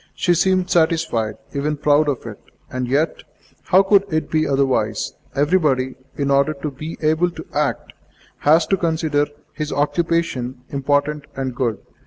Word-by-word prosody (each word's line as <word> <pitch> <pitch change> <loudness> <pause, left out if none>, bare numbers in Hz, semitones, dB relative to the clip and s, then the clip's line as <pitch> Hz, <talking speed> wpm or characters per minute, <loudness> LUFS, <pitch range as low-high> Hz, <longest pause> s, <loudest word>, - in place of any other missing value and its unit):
She 175 - +2
seemed 185 +1 +2
satisfied, 160 -10 +1 0.2
even 150 +1 -1
proud 150 +1 +3
of 135 -4 -3
it. 110 -3 -8 0.3
And, 125 -1 -2
yet, 150 +5 0 0.4
how 190 +2 +5
could 195 0 +4
it 155 0 -1
be 155 -1 +2
otherwise? 130 -6 0 0.2
Everybody, 145 -4 +2 0.2
in 140 -1 -1
order 140 +3 +3
to 140 +2 -4
be 155 +4 -7
able 160 +3 +3
to 175 - -9
act, - - -1 0.5
has 160 +2 +4
to 195 - +1
consider 160 -4 +1 0.3
his 150 -1 -4
occupation 150 -5 -1
important 145 +1 0
and 130 -1 -3
good. 120 -4 -1
150 Hz, 150 wpm, -20 LUFS, 135-165 Hz, 0.5 s, how